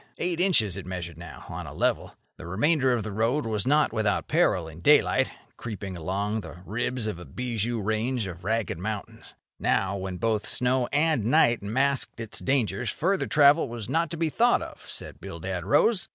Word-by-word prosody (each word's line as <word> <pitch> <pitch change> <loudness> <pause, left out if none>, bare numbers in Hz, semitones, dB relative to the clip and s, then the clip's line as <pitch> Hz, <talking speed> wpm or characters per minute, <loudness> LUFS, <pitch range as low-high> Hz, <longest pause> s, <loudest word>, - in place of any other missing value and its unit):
Eight 175 -1 -2
inches 115 - +2
it 95 - -7
measured 85 -3 -6
now, 85 -6 -10
on - - -6
a - - -9
level. - - 0 0.2
The - - -9
remainder 130 - +2
of 120 -3 0
the 105 - -5
road 115 +8 0
was 110 -1 -1
not 150 -3 +3
without 110 -2 0
peril 105 - +2
in 80 +1 -11
daylight, - - +4 0.3
creeping 100 -5 -6
along 100 +6 -2
the 85 -2 -10
ribs 120 +3 -2
of 105 -5 -3
a - - -8
bijou 115 - -2
range 110 +3 -1
of 90 -2 -8
ragged 110 -4 -1
mountains. 105 +2 -6 0.2
Now, 95 0 +1
when 95 -1 -4
both 110 +1 0
snow 125 0 +2
and 150 -6 +2
night 120 -2 +4
masked 130 +6 0
its 110 -2 -3
dangers, 120 -4 +1
further 190 - 0
travel 145 -1 +5
was 115 -3 -6
not 165 0 +1
to 170 - -5
be 165 0 +1
thought 240 +9 +3
of, - - -11
said - - -7
Bildad - - -5
Rose. 220 -5 +3
115 Hz, 185 wpm, -26 LUFS, 100-140 Hz, 0.3 s, travel